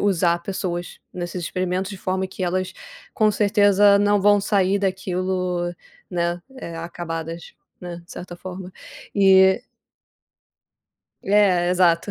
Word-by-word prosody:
usar 175 Hz, -3 st, +2 dB
pessoas 175 Hz, -2 st, -4 dB
nesses 175 Hz, 0 st, -5 dB
experimentos 185 Hz, +2 st, -2 dB
de 195 Hz, -, -7 dB
forma 190 Hz, 0 st, -2 dB
que 185 Hz, 0 st, -8 dB
elas, 185 Hz, +1 st, -1 dB, 0.4 s
com 215 Hz, -1 st, +3 dB
certeza, 205 Hz, -1 st, +4 dB
não 205 Hz, 0 st, +3 dB
vão 205 Hz, +1 st, +5 dB
sair 200 Hz, -1 st, +2 dB
daquilo, 185 Hz, -2 st, -1 dB, 0.4 s
né, 175 Hz, 0 st, -1 dB, 0.2 s
eh, 170 Hz, -8 st, -7 dB
acabadas, 165 Hz, 0 st, -6 dB, 0.3 s
né, 175 Hz, -1 st, -7 dB
de -, -, -21 dB
certa 175 Hz, 0 st, -8 dB
forma, 185 Hz, 0 st, -8 dB, 0.4 s
e 190 Hz, -1 st, +5 dB, 1.6 s
É, 190 Hz, -3 st, +3 dB
exato. 180 Hz, +1 st, +3 dB
185 Hz, 120 wpm, -22 LUFS, 175-195 Hz, 1.6 s, vão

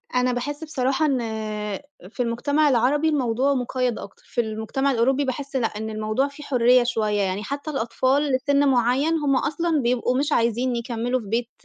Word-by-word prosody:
أنا 250 Hz, 0 st, +2 dB
باحس 290 Hz, +5 st, -4 dB
بصراحة 275 Hz, -1 st, 0 dB
إن 275 Hz, -4 st, +1 dB, 0.9 s
في 245 Hz, +3 st, -2 dB
المجتمع 285 Hz, +6 st, +1 dB
العربي 275 Hz, +5 st, +2 dB
الموضوع 265 Hz, -1 st, +1 dB
مقيّد 250 Hz, -2 st, -1 dB
أكتر، 200 Hz, -, -11 dB
في 240 Hz, -, -1 dB
المجتمع 220 Hz, +5 st, -1 dB
الأوروبي 265 Hz, +3 st, +2 dB
باحس 275 Hz, +1 st, -4 dB
لأ 245 Hz, -4 st, +2 dB
إن 220 Hz, +1 st, -6 dB
الموضوع 215 Hz, +5 st, -1 dB
فيه 285 Hz, +1 st, -11 dB
حرية 250 Hz, -2 st, +4 dB
شوية، 215 Hz, -4 st, 0 dB
يعني 195 Hz, +1 st, -1 dB
حتى 280 Hz, +5 st, -5 dB
الأطفال 270 Hz, +3 st, 0 dB
لسن 280 Hz, +2 st, +2 dB
معيّن 265 Hz, +5 st, +2 dB
هُم 285 Hz, -2 st, +1 dB
أصلًا 305 Hz, +3 st, 0 dB
بيبقوا 250 Hz, +1 st, +1 dB
مش 290 Hz, +3 st, 0 dB
عايزين 240 Hz, 0 st, +1 dB
يكمّلوا 240 Hz, +1 st, -2 dB
في 220 Hz, -, -10 dB
بيت 230 Hz, +3 st, -1 dB
255 Hz, 170 wpm, -23 LUFS, 235-280 Hz, 0.9 s, حرية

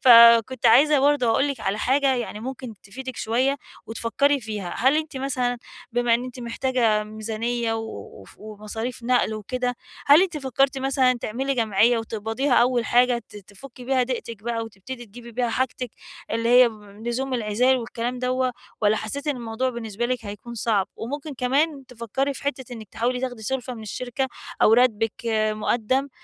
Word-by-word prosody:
فكنت 235 Hz, 0 st, +7 dB
عايزة 285 Hz, +6 st, +6 dB
برضه 285 Hz, -2 st, +3 dB
أقول 235 Hz, +5 st, +3 dB
لِك 270 Hz, -5 st, -4 dB
على 195 Hz, +2 st, -1 dB
حاجة 270 Hz, +3 st, +2 dB
يعني 235 Hz, -4 st, -4 dB
ممكن 255 Hz, -1 st, -6 dB
تفيدك 260 Hz, +5 st, -8 dB
شوية 255 Hz, +5 st, +1 dB, 0.3 s
وتفكري 275 Hz, +5 st, +1 dB
فيها، 210 Hz, -5 st, -5 dB
هل 265 Hz, +4 st, +4 dB
أنتِ 310 Hz, -3 st, -3 dB
مثلًا 250 Hz, -2 st, -1 dB, 0.3 s
بما 240 Hz, -1 st, +3 dB
إن 245 Hz, +2 st, -1 dB
أنت 255 Hz, 0 st, -8 dB
محتاجة 235 Hz, -3 st, +1 dB
ميزانية 225 Hz, +2 st, -2 dB
و 225 Hz, -, -2 dB, 0.4 s
وف 95 Hz, -, -16 dB
ومصاريف 215 Hz, +3 st, -6 dB
نقل 240 Hz, -2 st, +2 dB
وكده، 245 Hz, +4 st, -2 dB, 0.3 s
هل 290 Hz, +5 st, +8 dB
أنتِ 355 Hz, -5 st, -1 dB
فكرتِ 270 Hz, 0 st, +1 dB
مثلًا 265 Hz, -1 st, +3 dB
تعملي 265 Hz, +6 st, -2 dB
جمعية 225 Hz, +1 st, +3 dB
وتقبضيها 225 Hz, +5 st, -2 dB
أول 240 Hz, 0 st, +3 dB
حاجة 245 Hz, +1 st, +3 dB
ت -, -, -13 dB
تفُكَّي 235 Hz, +6 st, -12 dB
بها 260 Hz, 0 st, +2 dB
ضِيقتِك 230 Hz, -4 st, -4 dB
بقى 230 Hz, -1 st, -2 dB
وتبتدي 230 Hz, +3 st, -9 dB
تجيبي 235 Hz, +3 st, -12 dB
بيها 240 Hz, +1 st, 0 dB
حاجتِك، 250 Hz, 0 st, -2 dB, 0.4 s
اللي 230 Hz, +1 st, 0 dB
هي 245 Hz, 0 st, +7 dB, 0.4 s
لزوم 260 Hz, +2 st, -2 dB
العزِال 240 Hz, +3 st, +2 dB
والكلام 240 Hz, +1 st, -4 dB
دوَّه، 255 Hz, 0 st, 0 dB, 0.3 s
والّا 210 Hz, 0 st, +3 dB
حسِّيتِ 275 Hz, +8 st, -5 dB
إن 290 Hz, -3 st, 0 dB
الموضوع 235 Hz, +2 st, -2 dB
بالنسبة 235 Hz, -1 st, -3 dB
لِك 250 Hz, -3 st, -2 dB
هيكون 210 Hz, +4 st, -8 dB
صعب؟ 210 Hz, -4 st, +1 dB
وممكن 285 Hz, +5 st, -5 dB
كمان 275 Hz, +3 st, 0 dB
تفكري 250 Hz, +3 st, -3 dB
في -, -, -9 dB
حِتّة 260 Hz, -3 st, -3 dB
إنك 220 Hz, -4 st, -9 dB
تحاولي 245 Hz, +2 st, -1 dB
تاخدي 245 Hz, -4 st, -4 dB
سلفة 250 Hz, +2 st, -3 dB
من 225 Hz, -, -9 dB
الشركة، 250 Hz, +4 st, -3 dB, 0.4 s
أو 215 Hz, -, +6 dB
راتبِك 225 Hz, -2 st, +3 dB, 0.4 s
مُقدَّم، 240 Hz, +5 st, 0 dB
245 Hz, 165 wpm, -24 LUFS, 225-260 Hz, 0.4 s, هل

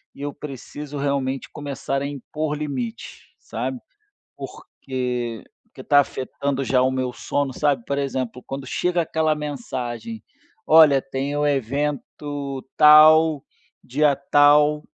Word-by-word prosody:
e -, -, -12 dB
eu 145 Hz, 0 st, -4 dB
preciso 145 Hz, +1 st, -8 dB
realmente 140 Hz, -1 st, -2 dB
começar 140 Hz, -1 st, -4 dB
a 140 Hz, -, -2 dB
impor 150 Hz, +2 st, -4 dB
limites, 130 Hz, -6 st, -5 dB, 0.2 s
sabe. 125 Hz, +2 st, -5 dB, 0.6 s
Porque 125 Hz, -3 st, -5 dB, 0.2 s
porque -, -, -13 dB
tá 145 Hz, -1 st, +5 dB
afetando 135 Hz, 0 st, -2 dB
já 130 Hz, -1 st, +2 dB
o 130 Hz, -, +3 dB
meu 130 Hz, -1 st, -2 dB
sono, 140 Hz, +1 st, -2 dB
sabe. 145 Hz, -4 st, 0 dB
Por 140 Hz, -, -2 dB
exemplo, 130 Hz, -3 st, -3 dB
quando 135 Hz, 0 st, -6 dB
chega 180 Hz, +6 st, 0 dB
aquela 160 Hz, -1 st, 0 dB
mensagem: 145 Hz, -, -5 dB, 0.4 s
"Olha, 155 Hz, -4 st, +7 dB
tem 135 Hz, +1 st, -4 dB
o 150 Hz, -, +1 dB
evento 140 Hz, +1 st, -3 dB
tal, 155 Hz, 0 st, +7 dB, 0.4 s
dia 145 Hz, +2 st, +2 dB, 0.2 s
tal", 150 Hz, +1 st, +5 dB
140 Hz, 125 wpm, -22 LUFS, 130-150 Hz, 0.6 s, Olha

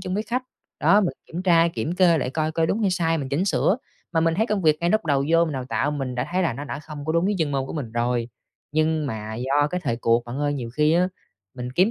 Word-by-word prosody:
chung 185 Hz, -1 st, -4 dB
với 210 Hz, -, 0 dB
khách, 240 Hz, +4 st, -2 dB, 0.4 s
đó, 205 Hz, -, +5 dB
mình 190 Hz, -, 0 dB
kiểm 175 Hz, +3 st, -5 dB
tra, 170 Hz, -2 st, +4 dB
kiểm 165 Hz, 0 st, -3 dB
kê 175 Hz, -3 st, +4 dB
lại 125 Hz, -, -2 dB
coi 155 Hz, +2 st, -1 dB
coi 160 Hz, 0 st, +1 dB
đúng 210 Hz, -, 0 dB
hay 200 Hz, -4 st, +2 dB
sai, 165 Hz, -2 st, +1 dB
mình 135 Hz, -2 st, -4 dB
chỉnh 145 Hz, +7 st, 0 dB
sửa. 155 Hz, -, +2 dB, 0.4 s
Mà 165 Hz, -, +2 dB
mình 165 Hz, 0 st, +2 dB
thấy 220 Hz, +5 st, +1 dB
công 210 Hz, -4 st, -1 dB
việc 155 Hz, -1 st, +4 dB
ngay 170 Hz, +1 st, +1 dB
lúc 215 Hz, 0 st, +2 dB
đầu 140 Hz, -3 st, +1 dB
vô, 165 Hz, 0 st, +5 dB
mình 160 Hz, -, -3 dB
đào 130 Hz, -2 st, -3 dB
tạo, 145 Hz, -, 0 dB
mình 135 Hz, -4 st, -3 dB
đã 125 Hz, -, -2 dB
thấy 185 Hz, +1 st, +2 dB
là 165 Hz, -, +1 dB
nó 140 Hz, +5 st, -6 dB
đã 140 Hz, -, -5 dB
không 150 Hz, -2 st, -8 dB
có 160 Hz, -, -1 dB
đúng 170 Hz, +2 st, +2 dB
với 205 Hz, +1 st, +1 dB
chuyên 160 Hz, -3 st, 0 dB
môn 135 Hz, -1 st, -1 dB
của -, -, -6 dB
mình 130 Hz, -8 st, -5 dB
rồi. 120 Hz, 0 st, 0 dB, 0.4 s
Nhưng 155 Hz, 0 st, +1 dB
mà 110 Hz, -2 st, -5 dB
do 135 Hz, +5 st, +1 dB
cái 180 Hz, -, -2 dB
thời 115 Hz, -8 st, -1 dB
cuộc 115 Hz, 0 st, +2 dB
bạn 120 Hz, +3 st, -6 dB
ơi, 145 Hz, 0 st, 0 dB
nhiều 120 Hz, -4 st, -5 dB
khi 150 Hz, +5 st, +2 dB
á, 180 Hz, +2 st, +3 dB, 0.5 s
mình 125 Hz, -1 st, -6 dB
kiếm 185 Hz, -, +3 dB
155 Hz, 290 wpm, -24 LUFS, 135-175 Hz, 0.5 s, đó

